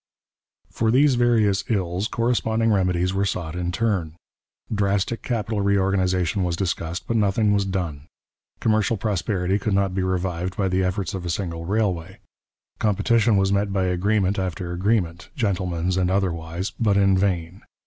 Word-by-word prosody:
For 115 Hz, -, 0 dB
these 135 Hz, +4 st, +4 dB
various 110 Hz, -5 st, +2 dB
ills 95 Hz, -2 st, 0 dB
corresponding 115 Hz, -1 st, +1 dB
remedies 90 Hz, -2 st, +1 dB
were 100 Hz, +1 st, +1 dB
sought 85 Hz, -4 st, -3 dB
in 90 Hz, 0 st, -2 dB
turn. 95 Hz, -7 st, -1 dB, 0.6 s
Drastic 100 Hz, +2 st, 0 dB
capital 110 Hz, -3 st, -2 dB
reorganization 95 Hz, -1 st, +1 dB
was 85 Hz, -1 st, 0 dB
discussed, 85 Hz, -1 st, -3 dB
but 115 Hz, -, 0 dB
nothing 105 Hz, 0 st, +2 dB
was 100 Hz, -1 st, +1 dB
done. 85 Hz, -7 st, -3 dB, 0.5 s
Commercial 110 Hz, 0 st, +1 dB
prosperity 95 Hz, -1 st, -1 dB
could 105 Hz, -2 st, 0 dB
not 100 Hz, -1 st, +1 dB
be 95 Hz, -, -1 dB
revived 90 Hz, -1 st, -2 dB
by 95 Hz, -2 st, +1 dB
the 95 Hz, +1 st, +1 dB
efforts 90 Hz, -1 st, -2 dB
of 95 Hz, -2 st, -4 dB
a 85 Hz, -, -4 dB
single 85 Hz, -2 st, -3 dB
railway. 95 Hz, -3 st, -1 dB, 0.6 s
Competition 110 Hz, +1 st, +2 dB
was 95 Hz, 0 st, +2 dB
met 100 Hz, 0 st, +1 dB
by 95 Hz, -1 st, 0 dB
agreement 95 Hz, +2 st, +1 dB
after 90 Hz, -1 st, -3 dB
agreement, 85 Hz, -3 st, -1 dB
'gentleman's' 95 Hz, -, -1 dB
and 90 Hz, -1 st, +1 dB
otherwise, 90 Hz, -1 st, -2 dB
but 105 Hz, -3 st, +2 dB
in 100 Hz, -1 st, +4 dB
vain. 95 Hz, -2 st, -1 dB
95 Hz, 150 wpm, -23 LUFS, 90-105 Hz, 0.6 s, these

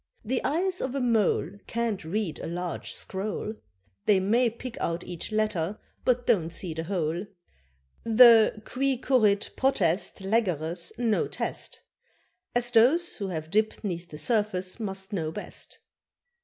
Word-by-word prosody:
The 250 Hz, +3 st, -1 dB
eyes 360 Hz, +6 st, 0 dB
of 260 Hz, +1 st, -2 dB
a -, -, 0 dB
mole 210 Hz, -, +1 dB
Can't 230 Hz, -4 st, -2 dB
read 175 Hz, 0 st, -2 dB
a -, -, -5 dB
large 175 Hz, +1 st, -4 dB
scroll; 205 Hz, +2 st, -4 dB, 0.5 s
They 200 Hz, -2 st, +5 dB
may 230 Hz, +6 st, +3 dB
pick 235 Hz, +2 st, -8 dB
out 170 Hz, +1 st, -1 dB
each 175 Hz, +3 st, -6 dB
letter, 215 Hz, -4 st, 0 dB, 0.3 s
but 245 Hz, -1 st, +2 dB
don't 165 Hz, -6 st, +2 dB
see 170 Hz, 0 st, -4 dB
the 160 Hz, +1 st, -4 dB
whole. 175 Hz, 0 st, -2 dB, 0.8 s
The 225 Hz, -2 st, +6 dB
qui 270 Hz, +1 st, 0 dB
currit 215 Hz, -6 st, +2 dB
potest 195 Hz, -8 st, +1 dB
Legere's 180 Hz, -5 st, 0 dB
no 230 Hz, -3 st, +1 dB
test, -, -, -3 dB, 0.7 s
As 240 Hz, 0 st, +2 dB
those 265 Hz, +10 st, +4 dB
who 200 Hz, -, -3 dB
have 160 Hz, -3 st, -5 dB
dipped 215 Hz, +3 st, +1 dB
'neath 175 Hz, -3 st, -4 dB
the 150 Hz, -, -8 dB
surface 190 Hz, +1 st, -1 dB
must 195 Hz, -1 st, -3 dB
know 160 Hz, -5 st, -1 dB
best. -, -, -7 dB
210 Hz, 140 wpm, -27 LUFS, 175-235 Hz, 0.8 s, The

